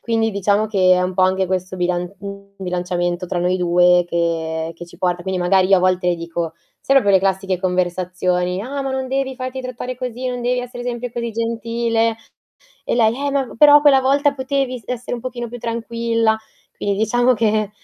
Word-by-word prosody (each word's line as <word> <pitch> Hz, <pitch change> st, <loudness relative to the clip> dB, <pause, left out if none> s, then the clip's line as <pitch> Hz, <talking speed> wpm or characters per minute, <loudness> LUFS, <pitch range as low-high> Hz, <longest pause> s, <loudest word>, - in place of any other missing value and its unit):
Quindi 225 Hz, -1 st, 0 dB
diciamo 205 Hz, +2 st, +1 dB
che 190 Hz, -3 st, +3 dB
è 180 Hz, -, +1 dB
un 180 Hz, 0 st, -2 dB
po' 185 Hz, -, +2 dB
anche 190 Hz, 0 st, +2 dB
questo 185 Hz, 0 st, -3 dB
bilan 180 Hz, +1 st, -1 dB, 0.5 s
bilanciamento 180 Hz, -1 st, -2 dB
tra 175 Hz, -, -2 dB
noi 180 Hz, +1 st, +1 dB
2 180 Hz, 0 st, +4 dB
che 165 Hz, -1 st, -1 dB
che 175 Hz, -, -9 dB
ci 175 Hz, 0 st, -16 dB
porta 175 Hz, -2 st, 0 dB
quindi 190 Hz, -1 st, -2 dB
magari 185 Hz, +1 st, +3 dB
io 195 Hz, -, +6 dB
a -, -, -2 dB
volte 185 Hz, -1 st, +2 dB
le 175 Hz, -, +2 dB
dico 170 Hz, -1 st, -4 dB, 0.3 s
sono 275 Hz, 0 st, +4 dB
quelle 200 Hz, -2 st, +4 dB
classiche 190 Hz, -1 st, 0 dB
conversazioni, 180 Hz, 0 st, -1 dB
"Ah, 275 Hz, +5 st, -4 dB
ma 270 Hz, -, -3 dB
non 265 Hz, -1 st, -3 dB
devi 265 Hz, 0 st, -1 dB
farti 255 Hz, 0 st, -5 dB
trattare 255 Hz, 0 st, -5 dB
così, 250 Hz, 0 st, -5 dB
non 245 Hz, -1 st, -4 dB
devi 250 Hz, +1 st, 0 dB
essere 245 Hz, 0 st, -7 dB
sempre 245 Hz, -1 st, -4 dB
così 235 Hz, -1 st, -3 dB
gentile." 230 Hz, 0 st, -1 dB, 0.7 s
E -, -, -1 dB
lei: 230 Hz, -1 st, +3 dB
"Eh, 280 Hz, +1 st, -2 dB
ma 275 Hz, -3 st, -1 dB
però 295 Hz, 0 st, +8 dB
quella 285 Hz, -2 st, +5 dB
volta 280 Hz, +2 st, +2 dB
potevi 260 Hz, -2 st, -2 dB
essere 250 Hz, 0 st, -4 dB
un 235 Hz, -, -8 dB
pochino 245 Hz, -2 st, -5 dB
più 245 Hz, +1 st, -8 dB
tranquilla". 230 Hz, -1 st, 0 dB, 0.4 s
Quindi 200 Hz, -1 st, -1 dB
diciamo 245 Hz, +3 st, +3 dB
che 215 Hz, -2 st, +1 dB
215 Hz, 190 wpm, -20 LUFS, 180-245 Hz, 0.7 s, però